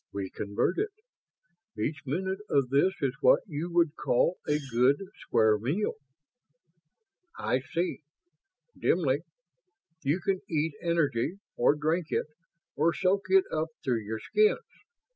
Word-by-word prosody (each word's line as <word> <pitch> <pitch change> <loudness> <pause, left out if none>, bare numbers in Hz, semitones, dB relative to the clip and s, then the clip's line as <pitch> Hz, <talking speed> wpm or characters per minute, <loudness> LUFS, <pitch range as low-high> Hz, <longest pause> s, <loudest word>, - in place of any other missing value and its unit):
We 100 -2 -4
convert 100 - -1
it. 430 - 0 0.9
Each 145 0 -2
minute 190 +7 -1
of 135 -3 +2
this 160 +7 +3
is 135 -3 +1
what - - +6
you 165 +1 -4
would 170 -3 +2
call 170 +8 +1
a 150 - +3
'good, 135 -1 +2 0.2
square 110 -1 +3
meal'." 150 - -1 1.4
"I 130 - 0
see... 165 +7 -3 0.7
dimly. 145 -6 +2 0.8
You 150 +5 +1
can 195 -1 0
eat 160 -1 0
energy, 155 -5 +1 0.2
or 120 +4 +4
drink 155 +3 0
it, - - 0 0.5
or 165 +3 +2
soak 190 +1 +1
it 190 0 +5
up 155 +1 0 0.2
through 120 -4 0
your 110 +1 -4
skins. 425 - +2
150 Hz, 130 wpm, -29 LUFS, 130-175 Hz, 1.4 s, what